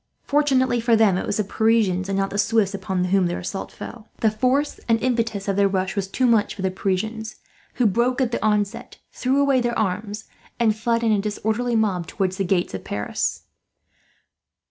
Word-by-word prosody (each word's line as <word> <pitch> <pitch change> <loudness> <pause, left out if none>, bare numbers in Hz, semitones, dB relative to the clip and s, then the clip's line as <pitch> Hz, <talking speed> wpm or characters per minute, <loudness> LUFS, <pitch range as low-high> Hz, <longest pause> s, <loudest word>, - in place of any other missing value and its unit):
Fortunately 265 -4 +2
for 230 0 +3
them 215 -4 +4
it 185 - -2
was - - -1
the 215 - +1
Parisians, 205 -3 +1
and 195 - 0
not 195 0 0
the 200 - -2
Swiss, 210 -1 +2
upon 190 -2 -2
whom 185 0 +2
their 175 - -2
assault 195 +2 -5
fell. 230 -2 -10
The 220 - +3
force 255 +7 0
and 225 0 +4
impetus 230 -5 -1
of 195 -1 0
their 200 0 +4
rush 190 0 -1
was 200 -2 -1
too 255 +6 0
much 230 -4 +2
for 190 - -6
the 190 - +1
Parisians, 215 +4 -2 0.4
who 245 - +1
broke 240 +5 +2
at 255 -3 +1
the - - -2
onset, 210 0 -1
threw 260 +2 0
away 275 -2 +3
their 240 0 -1
arms, 210 +1 -2 0.4
and 220 -3 +3
fled 230 +1 0
in 225 - +3
a 210 - +3
disorderly 220 +3 -1
mob 195 -6 0
towards 190 -2 -2
the 195 - 0
gates 180 -1 0
of 95 - -5
Paris. 105 0 -3
215 Hz, 200 wpm, -23 LUFS, 195-235 Hz, 0.4 s, them